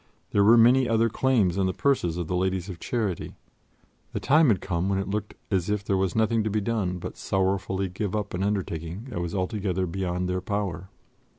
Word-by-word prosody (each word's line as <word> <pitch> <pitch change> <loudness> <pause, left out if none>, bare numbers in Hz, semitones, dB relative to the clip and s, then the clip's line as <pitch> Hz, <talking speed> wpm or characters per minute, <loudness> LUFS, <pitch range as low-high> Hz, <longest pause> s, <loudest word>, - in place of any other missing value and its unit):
There 100 - +4
were 115 +3 +7
many 125 +2 +5
other 115 0 +3
claims 105 -8 +2
on 95 - +2
the 95 - -2
purses 90 -12 +1
of 85 - -2
the 90 - -2
Ladies 95 0 -1
of 90 -3 -7
Charity; 105 -7 -3 0.8
the - - -1
time 155 +3 +4
had 105 -7 +3
come 90 +1 -1
when 100 - +1
it 95 - -2
looked 105 +1 -3 0.2
as 95 -1 0
if 105 -1 0
there 100 - +1
was 95 -1 0
nothing 110 0 +2
to 110 - -1
be 105 +1 0
done 100 -4 -1
but - - -7
sorrowfully 95 0 0
give 95 +2 -3
up 105 -1 -3
an 90 - -2
undertaking 95 -1 -2
that 85 - -3
was 85 +1 -3
altogether 95 -1 -1
beyond 90 0 -2
their 90 0 -1
power. 95 -3 -3
95 Hz, 210 wpm, -26 LUFS, 90-105 Hz, 0.8 s, were